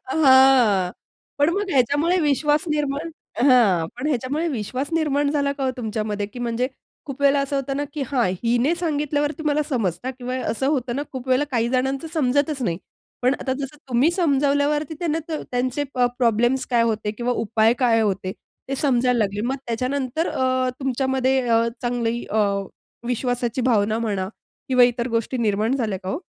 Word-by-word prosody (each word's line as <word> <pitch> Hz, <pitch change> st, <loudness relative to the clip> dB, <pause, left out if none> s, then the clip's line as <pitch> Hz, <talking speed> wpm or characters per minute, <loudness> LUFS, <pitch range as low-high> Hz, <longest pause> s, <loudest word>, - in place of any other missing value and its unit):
अ, 260 Hz, -, -5 dB
हां 260 Hz, -, +5 dB, 0.5 s
पण 290 Hz, +2 st, +4 dB
मग 405 Hz, -1 st, -2 dB
ह्याच्यामुळे 290 Hz, +7 st, +2 dB
विश्वास 295 Hz, +1 st, +2 dB
निर्माण 295 Hz, +1 st, -1 dB, 0.4 s
हां. 205 Hz, -11 st, +4 dB
पण 260 Hz, +4 st, -3 dB
ह्याच्यामुळे 285 Hz, +4 st, -1 dB
विश्वास 255 Hz, +2 st, -3 dB
निर्माण 290 Hz, -3 st, +1 dB
झाला 280 Hz, -1 st, 0 dB
का 275 Hz, -1 st, -4 dB
हो 260 Hz, -, +1 dB
तुमच्यामध्ये 215 Hz, -3 st, -3 dB
की 225 Hz, +4 st, -11 dB
म्हणजे 240 Hz, +1 st, -1 dB, 0.4 s
खूप 275 Hz, 0 st, -7 dB
वेळेला 280 Hz, 0 st, +4 dB
असं 275 Hz, 0 st, -2 dB
होतं 275 Hz, 0 st, -2 dB
ना 290 Hz, -, -1 dB
की 295 Hz, -, -3 dB
हां, 245 Hz, -6 st, +1 dB, 0.2 s
हिने 245 Hz, +7 st, +2 dB
सांगितल्यावरती 300 Hz, -2 st, -1 dB
मला 300 Hz, +1 st, +2 dB
समजता 230 Hz, -, -1 dB
किंवा 255 Hz, 0 st, -5 dB
असं 265 Hz, +4 st, -1 dB
होतं 260 Hz, -4 st, 0 dB
ना 285 Hz, -, -1 dB
खूप 260 Hz, 0 st, -7 dB
वेळेला 260 Hz, +3 st, +3 dB
काही 235 Hz, -2 st, +1 dB
जणांचं 265 Hz, +4 st, -1 dB
समजतच 285 Hz, -1 st, +1 dB
नाही 170 Hz, -6 st, -1 dB, 0.4 s
पण 255 Hz, +3 st, +3 dB
आता 260 Hz, -, -1 dB
जसं 275 Hz, +2 st, -5 dB
तुम्ही 255 Hz, +7 st, +3 dB
समजावल्यावरती 295 Hz, -2 st, +1 dB
त्यांना 325 Hz, -2 st, -1 dB
त 325 Hz, -, -5 dB, 0.2 s
त्यांचे 255 Hz, +3 st, -1 dB
प 250 Hz, -, -2 dB, 0.2 s
प्रॉब्लेम्स 240 Hz, +2 st, +2 dB
काय 240 Hz, -2 st, +2 dB
होते 220 Hz, -2 st, 0 dB
किंवा 240 Hz, +3 st, -2 dB
उपाय 225 Hz, +1 st, +3 dB
काय 235 Hz, -3 st, +3 dB
होते 195 Hz, -3 st, -1 dB, 0.4 s
ते 275 Hz, -, -1 dB
समजायला 250 Hz, -3 st, +2 dB
लागले 205 Hz, -1 st, 0 dB
मग 265 Hz, +2 st, -1 dB
त्याच्यानंतर 255 Hz, +6 st, -1 dB
अ, 255 Hz, 0 st, 0 dB
तुमच्यामध्ये 265 Hz, 0 st, +1 dB
अ, 230 Hz, 0 st, +3 dB, 0.2 s
चांगली 240 Hz, -1 st, -1 dB
अ, 220 Hz, -, 0 dB, 0.7 s
विश्वासाची 245 Hz, 0 st, -1 dB
भावना 220 Hz, -3 st, +2 dB
म्हणा 200 Hz, -5 st, -2 dB, 0.4 s
किंवा 255 Hz, -1 st, +6 dB
इतर 245 Hz, 0 st, 0 dB
गोष्टी 230 Hz, +2 st, -1 dB
निर्माण 220 Hz, +2 st, +1 dB
झाल्या 215 Hz, -7 st, -2 dB
का 185 Hz, -, -6 dB
हो? 290 Hz, -, -2 dB
255 Hz, 170 wpm, -22 LUFS, 235-285 Hz, 0.7 s, किंवा